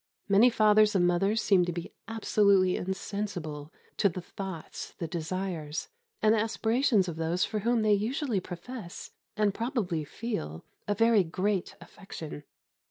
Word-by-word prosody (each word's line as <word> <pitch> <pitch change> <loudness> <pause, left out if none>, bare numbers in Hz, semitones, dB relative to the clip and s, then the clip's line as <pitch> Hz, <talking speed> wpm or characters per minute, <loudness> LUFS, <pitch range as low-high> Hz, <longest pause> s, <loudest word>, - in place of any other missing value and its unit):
Many 205 +5 +6
fathers 215 -2 +4
and 180 -2 +4
mothers 195 +6 +2
seem 190 -3 +4
to 175 - -2
be 170 0 -6
absolutely 200 -4 +3
insensible 180 -6 -4 0.3
to 200 - +4
the 180 - -6
thoughts, 185 -2 -7
the 165 - -3
desires, 170 - -4 0.3
and 215 - +6
the 225 - +3
aspirations 225 -1 +2
of 165 -2 -5
those 165 +2 +1
for 215 - -3
whom 230 +1 +1
they 215 -1 +4
usually 225 +2 0
profess, 180 +2 -8 0.3
and 210 -2 +2
probably 210 - -1
feel, 145 - -5 0.2
a 205 - +1
very 225 -1 +4
great 185 +3 -1
affection. 165 -4 -9
195 Hz, 145 wpm, -29 LUFS, 175-215 Hz, 0.3 s, Many